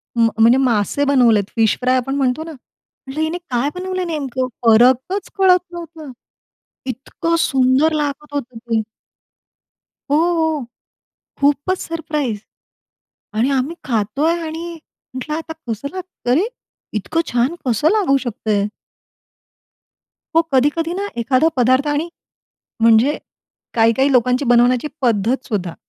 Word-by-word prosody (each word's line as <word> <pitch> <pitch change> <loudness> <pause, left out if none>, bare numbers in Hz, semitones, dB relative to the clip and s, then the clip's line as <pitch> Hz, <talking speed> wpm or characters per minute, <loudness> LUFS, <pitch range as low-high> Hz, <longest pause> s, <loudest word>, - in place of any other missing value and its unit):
म 230 -1 +4
म्हणजे 230 +3 +6
मासे 245 0 +1
बनवलेत, 245 -7 +4
फिश 225 -2 +2
फ्राय 255 +1 +3
आपण 270 +2 -2
म्हणतो 270 +2 0
ना, 325 - -8
म्हंटलं 275 +1 -10
हिने 320 +2 -1
काय 250 +2 0
बनवलंय 370 0 -3
नेमकं 270 -6 -2 0.2
फरकच 255 - +4
कळत 370 -2 +5
नव्हता. 330 -4 -9 0.8
इतकं 270 +6 -2
सुंदर 265 +3 +3
लागत 295 -1 -3
होतं 250 -4 -4
ते. 225 -1 -1 1.3
हो, 290 - +4
हो. 320 -3 +1 0.8
खूपचं 285 +5 +2
सरप्राईज 300 -8 -3 1.0
आणि 245 +5 +2
आम्ही 275 +4 0
खातोय 240 +7 0
आणि 330 +2 -5 0.4
म्हटलं, 260 +4 -4
"आता 320 0 -6 0.2
कसं 230 +5 -3
लागत 370 -8 -8
अरे! 300 - +3 0.5
इतकं 215 - -1
छान 245 +6 +1
कसं 245 +5 +2
लागू 395 -11 +3
शकतंय?" 215 -3 -1 1.7
हो, 330 - +7
कधी-कधी 295 +6 +2
ना 400 +2 -3
एखादा 255 +6 +2
पदार्थ 255 +3 +3
आणि 295 +3 -1 0.7
म्हणजे 230 +5 +4 0.6
काही-काही 230 +5 +3
लोकांची 250 +2 +2
बनवण्याची 245 +2 +3
पद्धत 235 +2 +1
सुद्धा. 185 -6 -3
270 Hz, 120 wpm, -19 LUFS, 240-315 Hz, 1.7 s, हो